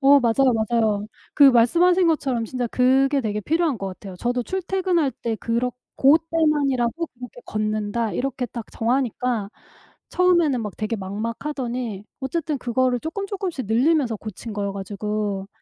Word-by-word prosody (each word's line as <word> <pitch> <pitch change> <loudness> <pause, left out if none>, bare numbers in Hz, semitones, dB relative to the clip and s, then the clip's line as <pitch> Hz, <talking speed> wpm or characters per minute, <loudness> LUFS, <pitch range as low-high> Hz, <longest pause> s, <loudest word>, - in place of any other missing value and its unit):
어 280 0 +6
맞아요, 250 +2 +3
맞아요. 220 -2 +1 0.3
그 290 - +7
말씀하신 340 +9 +5
것처럼 265 -7 +1
진짜 245 +2 -3
그게 265 +3 +3
되게 210 -3 -2
필요한 315 - 0
것 195 - -4
같아요. 190 0 -9
저도 245 +5 -1
출퇴근할 365 -2 0
때 230 -3 -4
그렇 235 +2 -1 0.2
'고때만이라도 295 -4 +3 0.2
그렇게 245 0 -10
걷는다.' 215 +1 -1
이렇게 260 -1 -2
딱 235 -2 -7
정하니까 240 -3 -1 0.6
처음에는 340 -9 +3
막 210 -3 -6
되게 215 +1 -2
막막하더니 230 +2 -4 0.2
어쨌든 295 +2 -2
그거를 250 0 0
쪼끔, 335 +7 -4
쪼끔씩 375 - -4
늘리면서 250 +2 +2
고친 215 +2 -8
거여 200 -1 -2
가지고 200 0 -3
245 Hz, 350 characters per minute, -23 LUFS, 215-290 Hz, 0.6 s, 그